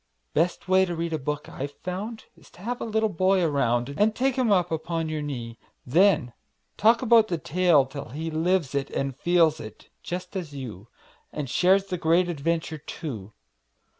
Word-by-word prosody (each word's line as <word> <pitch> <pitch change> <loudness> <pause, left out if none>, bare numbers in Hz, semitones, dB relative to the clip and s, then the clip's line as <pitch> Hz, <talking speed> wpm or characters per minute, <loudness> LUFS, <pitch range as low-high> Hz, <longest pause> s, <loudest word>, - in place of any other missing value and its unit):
Best 175 +2 0
way 190 0 +5
to 175 -2 -4
read 165 0 -3
a 160 - -1
book 150 +2 -3
I've 140 +2 -6
found 200 +5 -5
Is - - -19
have 235 +7 -5
a - - -2
little 220 0 +1
boy 185 -1 +2
around 130 -4 +1
And 215 +1 +3
take 265 0 +1
him 255 -5 +1
up 180 -3 +2
upon 165 0 -2
your 155 -1 -2
knee; 120 -6 -6 0.3
Then 155 -4 +3 0.4
talk 230 +3 +4
about 230 -2 +5
the 175 - -1
tale, 165 -3 +3
till 140 +1 -7
he 160 +6 -4
Lives 165 -2 +1
it 140 -1 -1
and 135 -1 -2
feels 165 0 +3
it, 110 -6 -11
just 180 +2 -6
as 165 -6 -5
you, 115 -6 -8 0.4
And 150 -2 -4
shares 190 +8 +3
the 180 -3 -4
great 170 +2 +3
adventure, 160 0 -2
too. 115 - -7
165 Hz, 180 wpm, -26 LUFS, 140-185 Hz, 0.4 s, way